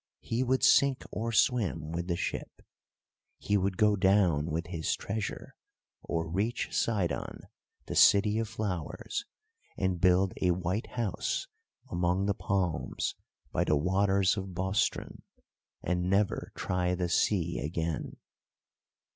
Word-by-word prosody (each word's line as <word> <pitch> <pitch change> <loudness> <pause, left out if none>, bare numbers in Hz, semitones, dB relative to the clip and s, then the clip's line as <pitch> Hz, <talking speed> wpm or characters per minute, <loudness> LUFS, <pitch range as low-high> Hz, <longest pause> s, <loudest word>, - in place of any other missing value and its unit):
He 115 +2 -2
would 130 +1 +1
sink 140 -2 +5
or 115 +2 -2
swim 110 - +1
with 85 +1 -3
the 85 - 0
ship; - - -5 0.7
he 105 - -1
would 95 -1 +1
go 105 -1 +4
down 95 -6 +3
with 85 +1 -2
his 85 -3 -2
treasure, 105 +1 -5 0.5
or 80 -1 -2
reach 100 +9 -1
Sidon, 100 -7 -1 0.4
the - - -5
City 105 +2 +5
of 115 -1 -2
Flowers, 100 -7 -4 0.5
and 95 -3 -1
build 90 +1 +4
a 90 - +3
white 90 +4 -2
house 115 -6 -1 0.5
among 90 +2 +1
the 100 - +2
palms 95 -4 -1 0.4
by - - +1
the 75 - +2
waters 95 +4 +2
of 95 -2 -5
Bostren, 95 +2 -1 0.6
and 90 +1 0
never 100 +1 +1
try 90 0 0
the 90 0 -1
sea 85 -1 +1
again. 80 +1 -3
95 Hz, 130 wpm, -30 LUFS, 85-105 Hz, 0.7 s, sink